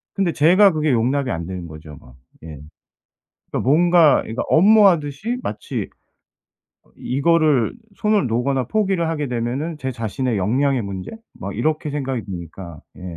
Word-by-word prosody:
근데 190 -4 0
제가 185 +6 +5
그게 155 -2 0
용납이 130 +2 0
안 85 0 -4
되는 90 -1 -6
거죠 80 -1 -11
뭐. 65 - -18 0.3
예. - - -9 1.0
그러니까 - - -2
뭔가 165 +2 +4
이거 115 - -4
업무 205 +5 +6
하듯이 170 - -1
마치 105 - -5 0.9
어 - - -30
이거를 145 -2 +1 0.2
손을 210 -8 +1
놓거나 125 +3 0
포기를 195 - 0
하게 155 -3 -2
되면은 125 +7 -3
제 130 -3 -3
자신의 115 +1 -3
역량의 130 +6 +1
문제? 95 -2 -6 0.2
막 100 +1 -7
이렇게 155 +4 -1
생각이 135 -5 -3
드니까 85 -3 -9 0.2
예. - - -12
135 Hz, 310 characters per minute, -20 LUFS, 110-165 Hz, 1.0 s, 업무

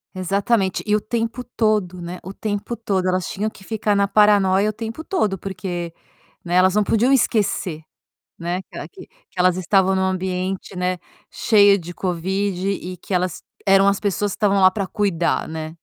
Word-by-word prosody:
Exatamente, 195 +2 0
e 210 - +3
o 215 - +2
tempo 230 +3 -3
todo, 215 -7 0
né, 175 +1 -6
o 190 - -7
tempo 205 +3 -3
todo, 200 -5 -1
elas 185 0 0
tinham 210 +3 -2
que 195 - -16
ficar 210 0 -1
na 200 0 +2
paranoia 200 -1 +4
o - - -17
tempo 225 +8 -6
todo 215 - 0
porque, 175 -3 -5 0.5
né, 175 0 -2
elas 185 0 +5
não 210 0 +3
podiam 235 +6 +2
esquecer, 200 -9 0 0.6
né, 175 +2 -2
que - - -28
ela - - -6
que 385 -2 -13
que - - -17
elas 180 0 +3
estavam 190 +1 +2
em - - +1
um - - +1
ambiente, 185 0 -3
né, 180 0 0 0.3
cheia 205 -2 +4
de 175 0 -8
Covid 190 +2 -2
e 185 -2 -4
que 185 - -7
elas 180 -1 -1 0.2
eram 195 0 +5
as 200 0 +2
pessoas 205 0 -1
que - - -6
estavam 200 -2 +2
lá 185 0 +7
para 195 -1 -3
cuidar, 190 -6 0
né. 160 0 -5
195 Hz, 190 wpm, -21 LUFS, 185-210 Hz, 0.6 s, lá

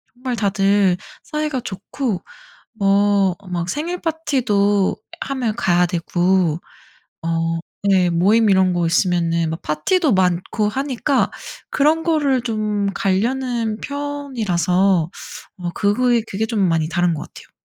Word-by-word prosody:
정말 250 0 -3
다들 195 -3 +2 0.2
사이가 300 -3 -2
좋고 205 +1 -4 0.5
뭐 200 -2 +3 0.2
막 175 0 -2
생일 335 - -3
파티도 215 - +1 0.3
하면 250 -5 -2
가야 180 -6 +3
되고 175 -1 +1 0.6
어 165 0 -1 0.2
네 190 -3 +3
모임 205 +7 +3
이런 190 -1 +3
거 175 -1 0
있으면은 170 -1 +1
막 160 - -4
파티도 280 - +1
많고 185 +3 +1
하니까 270 +3 0 0.4
그런 310 +3 +2
거를 290 -6 +1
좀 215 -3 -1
가려는 230 +3 0
편이라서 205 - 0 0.5
어 180 -2 -4
그거이 235 +3 +2
그게 210 +3 -1
좀 220 -1 -2
많이 160 -2 +1
다른 175 -1 +1
것 150 - -5
같아요. - - -15
200 Hz, 235 characters per minute, -20 LUFS, 180-255 Hz, 0.6 s, 뭐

